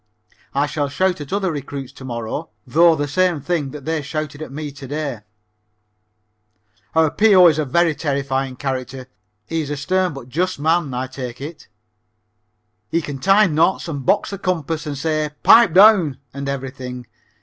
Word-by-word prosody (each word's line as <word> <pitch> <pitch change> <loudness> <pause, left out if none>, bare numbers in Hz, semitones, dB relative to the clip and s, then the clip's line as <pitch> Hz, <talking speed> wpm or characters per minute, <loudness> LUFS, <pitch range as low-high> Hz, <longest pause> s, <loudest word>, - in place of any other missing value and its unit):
I 140 +1 +2
shall 145 -1 -2
shout 180 +3 0
at 145 - -8
other 195 -2 0
recruits 140 -3 -6
to - - -12
morrow, 120 -3 -5 0.2
though, 165 +6 +5
the 145 -1 -2
same 180 +1 +1
thing 145 -1 -2
that 140 0 -9
they 160 -1 -1
shouted 150 0 -5
at 155 - -7
me 150 +1 -5
to 135 -1 -10
day. 145 -4 -3 1.8
Our 160 -2 +4
P.O. 200 -3 +6
is 155 -1 0
a 155 - 0
very 170 +4 +2
terrifying 135 -2 -2
character. 130 -1 -4 0.4
He 165 0 -2
is 145 - -5
a 145 - -3
stern 180 +3 0
but 135 -3 -9
just 180 +8 -1
man, 160 0 +1
I 125 +1 -2
take 130 -2 -7
it. 150 +4 -9 1.2
He 165 - +1
can 145 -2 -6
tie 195 +6 +5
knots 165 +2 +1
and 145 -5 -4
box 200 +10 +1
the 200 - -5
compass 165 -4 -2
and 145 -1 -4
say 155 +1 -1
"pipe 230 -5 +7
down" 190 - +6 0.2
and 140 0 -4
everything. 130 -2 -6
150 Hz, 170 wpm, -20 LUFS, 135-170 Hz, 1.8 s, pipe